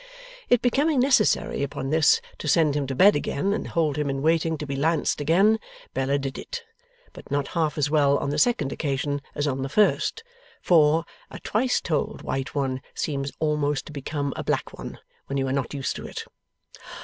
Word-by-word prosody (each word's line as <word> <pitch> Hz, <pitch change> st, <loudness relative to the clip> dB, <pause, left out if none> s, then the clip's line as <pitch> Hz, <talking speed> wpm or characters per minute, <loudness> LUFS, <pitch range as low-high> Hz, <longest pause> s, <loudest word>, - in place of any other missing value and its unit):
It 245 Hz, -, +4 dB
becoming 275 Hz, +4 st, +2 dB
necessary, 250 Hz, -, +2 dB
upon 135 Hz, -1 st, -3 dB
this, 155 Hz, -1 st, +4 dB, 0.2 s
to -, -, -5 dB
send 150 Hz, -1 st, +3 dB
him 145 Hz, -2 st, -1 dB
to 135 Hz, -, -3 dB
bed 200 Hz, +9 st, +6 dB
again 145 Hz, +6 st, -1 dB
and -, -, -3 dB
hold 155 Hz, -3 st, 0 dB
him 150 Hz, -1 st, 0 dB
in 135 Hz, 0 st, -2 dB
waiting 160 Hz, 0 st, +2 dB
to 150 Hz, -, -5 dB
be 140 Hz, -1 st, -4 dB
lanced 155 Hz, +1 st, +1 dB
again, 195 Hz, +9 st, +4 dB, 0.3 s
Bella 135 Hz, +2 st, +1 dB
did 135 Hz, -1 st, -4 dB
it. 485 Hz, -1 st, -6 dB, 0.5 s
But -, -, -13 dB
not 140 Hz, -1 st, -1 dB
half 160 Hz, -3 st, -1 dB
as 145 Hz, 0 st, 0 dB
well 145 Hz, -2 st, +4 dB
on 140 Hz, -, -2 dB
the 150 Hz, -, 0 dB
second 150 Hz, -, +2 dB
occasion 145 Hz, -1 st, -2 dB
as 145 Hz, -, -1 dB
on 135 Hz, -2 st, -1 dB
the 135 Hz, -, -3 dB
first; 215 Hz, -, +2 dB, 0.4 s
for, 160 Hz, -1 st, +4 dB, 0.2 s
a -, -, -8 dB
twice 245 Hz, +4 st, 0 dB
told 155 Hz, -5 st, -2 dB
white 135 Hz, +2 st, -3 dB
one 135 Hz, -2 st, -1 dB
seems 140 Hz, -2 st, -2 dB
almost 150 Hz, -2 st, 0 dB
to -, -, -10 dB
become 140 Hz, 0 st, -3 dB
a -, -, -4 dB
black -, -, -2 dB
one, -, -, -8 dB, 0.3 s
when 140 Hz, -, -2 dB
you 135 Hz, -1 st, 0 dB
are 130 Hz, -, -1 dB
not 135 Hz, -4 st, -1 dB
used 135 Hz, -2 st, -2 dB
to -, -, -7 dB
it. -, -, -6 dB
150 Hz, 195 wpm, -25 LUFS, 140-165 Hz, 0.5 s, bed